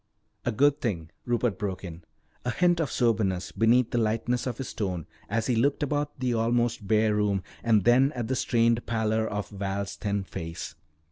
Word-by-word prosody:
"A 120 Hz, -, +1 dB
good 145 Hz, +6 st, +3 dB
thing," 85 Hz, -9 st, -2 dB, 0.2 s
Rupert 120 Hz, -5 st, 0 dB
broke 95 Hz, -2 st, -3 dB
in, 85 Hz, -2 st, -8 dB, 0.4 s
a 125 Hz, -, -1 dB
hint 175 Hz, +6 st, +2 dB
of 160 Hz, -, -1 dB
soberness 105 Hz, -7 st, +1 dB
beneath 115 Hz, +2 st, +3 dB
the 120 Hz, -, +1 dB
lightness 115 Hz, +3 st, 0 dB
of 120 Hz, -, -3 dB
his 135 Hz, -, -5 dB
tone 90 Hz, -7 st, -3 dB, 0.2 s
as 115 Hz, -1 st, 0 dB
he 125 Hz, -, +1 dB
looked 140 Hz, +6 st, +2 dB
about 145 Hz, 0 st, -2 dB
the 125 Hz, -2 st, 0 dB
almost 115 Hz, -1 st, +1 dB
bare 110 Hz, 0 st, +3 dB
room 105 Hz, -2 st, +1 dB, 0.2 s
and 110 Hz, -4 st, +4 dB
then 130 Hz, +6 st, +5 dB
at 120 Hz, -3 st, -3 dB
the 130 Hz, -, 0 dB
strained 115 Hz, -1 st, +2 dB
pallor 110 Hz, -1 st, +1 dB
of 105 Hz, -1 st, -3 dB
Val's 100 Hz, 0 st, -3 dB
thin 100 Hz, -1 st, -2 dB
face. 85 Hz, -2 st, -6 dB
115 Hz, 185 wpm, -27 LUFS, 100-120 Hz, 0.4 s, then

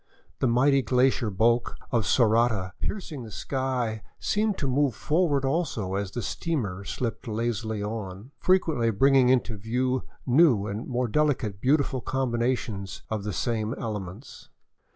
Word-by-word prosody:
The 130 Hz, -, +2 dB
mighty 135 Hz, +4 st, +4 dB
glacier 125 Hz, -1 st, +2 dB
bulk 115 Hz, +4 st, +2 dB, 0.2 s
of 115 Hz, -3 st, +1 dB
Sorata 110 Hz, -5 st, +2 dB
piercing 170 Hz, -9 st, -4 dB
the 115 Hz, -, -8 dB
sky 125 Hz, -2 st, -2 dB, 0.2 s
seemed 210 Hz, -1 st, 0 dB
to 140 Hz, -, -2 dB
move 135 Hz, -2 st, +1 dB
forward 150 Hz, -4 st, +1 dB
also, 135 Hz, -, -1 dB
as 100 Hz, 0 st, -1 dB
the 120 Hz, +4 st, -5 dB
steamer 105 Hz, -, -2 dB
slipped 115 Hz, 0 st, -4 dB
lazily 110 Hz, -1 st, -2 dB
on, 105 Hz, +1 st, -6 dB
frequently 160 Hz, -11 st, +2 dB
bringing 130 Hz, +4 st, +4 dB
into 125 Hz, -4 st, +2 dB
view 125 Hz, +5 st, 0 dB, 0.2 s
new 125 Hz, -6 st, +4 dB
and 105 Hz, +2 st, -4 dB
more 125 Hz, -1 st, 0 dB
delicately 125 Hz, -6 st, 0 dB
beau 140 Hz, +4 st, +4 dB
tiful 135 Hz, -3 st, -2 dB
combinations 115 Hz, -7 st, -2 dB
of 110 Hz, -2 st, -2 dB
the 105 Hz, -, -3 dB
same 115 Hz, +1 st, -1 dB
elements. 105 Hz, +1 st, -7 dB
120 Hz, 140 wpm, -26 LUFS, 110-135 Hz, 0.2 s, mighty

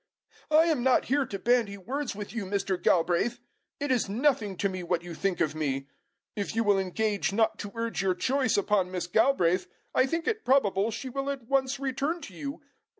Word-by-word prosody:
"I 310 Hz, +1 st, +6 dB
am 320 Hz, -6 st, +1 dB
not 255 Hz, 0 st, +3 dB
here 285 Hz, -3 st, +2 dB
to 200 Hz, -, -4 dB
bandy 225 Hz, -1 st, +1 dB
words 255 Hz, +6 st, -4 dB
with 210 Hz, +1 st, -7 dB
you, 225 Hz, -4 st, -3 dB
Mr. 195 Hz, -1 st, -1 dB
Galbraith. 180 Hz, +7 st, +2 dB, 0.4 s
It 285 Hz, -1 st, -1 dB
is 245 Hz, -6 st, +1 dB
nothing 225 Hz, -4 st, +1 dB
to 200 Hz, -, +1 dB
me 185 Hz, -1 st, -4 dB
what 175 Hz, -1 st, -1 dB
you 175 Hz, -1 st, -7 dB
think 190 Hz, +2 st, -1 dB
of 155 Hz, -, +1 dB
me. 140 Hz, -3 st, -2 dB, 0.5 s
If 205 Hz, +1 st, -3 dB
you 225 Hz, -, +2 dB
will 205 Hz, -2 st, +3 dB
engage 200 Hz, +2 st, 0 dB
not 220 Hz, +1 st, +1 dB
to 205 Hz, -, -6 dB
urge 230 Hz, -3 st, -2 dB
your 190 Hz, -2 st, +1 dB
choice 255 Hz, +4 st, +1 dB
upon 200 Hz, -2 st, +2 dB
Miss 180 Hz, -2 st, -3 dB
Galbraith, 185 Hz, -2 st, +2 dB, 0.3 s
I 255 Hz, -, +3 dB
think 330 Hz, +3 st, -2 dB
it 440 Hz, -1 st, 0 dB
probable 210 Hz, -6 st, +3 dB
she 230 Hz, +4 st, -5 dB
will 275 Hz, +2 st, -3 dB
at 275 Hz, -3 st, -4 dB
once 270 Hz, +2 st, 0 dB
return 275 Hz, +5 st, -1 dB
to 195 Hz, -, -9 dB
you. 280 Hz, -, -6 dB
220 Hz, 205 wpm, -28 LUFS, 190-270 Hz, 0.5 s, I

